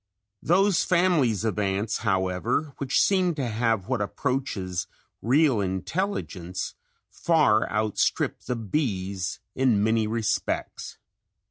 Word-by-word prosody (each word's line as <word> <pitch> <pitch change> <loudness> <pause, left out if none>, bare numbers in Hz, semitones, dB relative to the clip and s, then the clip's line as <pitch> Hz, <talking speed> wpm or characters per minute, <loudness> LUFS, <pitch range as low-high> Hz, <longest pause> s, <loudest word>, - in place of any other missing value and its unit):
Those 190 +3 +3
families 170 - +2
of 105 -2 -1
ants, 100 +2 -1
however, 100 +8 0
which 140 -1 +1
seem 185 -4 +3
to 135 -4 -2
have 115 -3 0
what 125 -4 -1
approaches 100 -4 -2 0.3
real 135 +1 +3
intelligence, 95 - -3 0.4
far 155 -10 +2
outstrip 105 +1 0
the 125 - -2
bees 100 - -2
in 125 -6 +2
many 110 0 +2
respects. 110 0 -2
115 Hz, 105 wpm, -26 LUFS, 100-145 Hz, 0.4 s, Those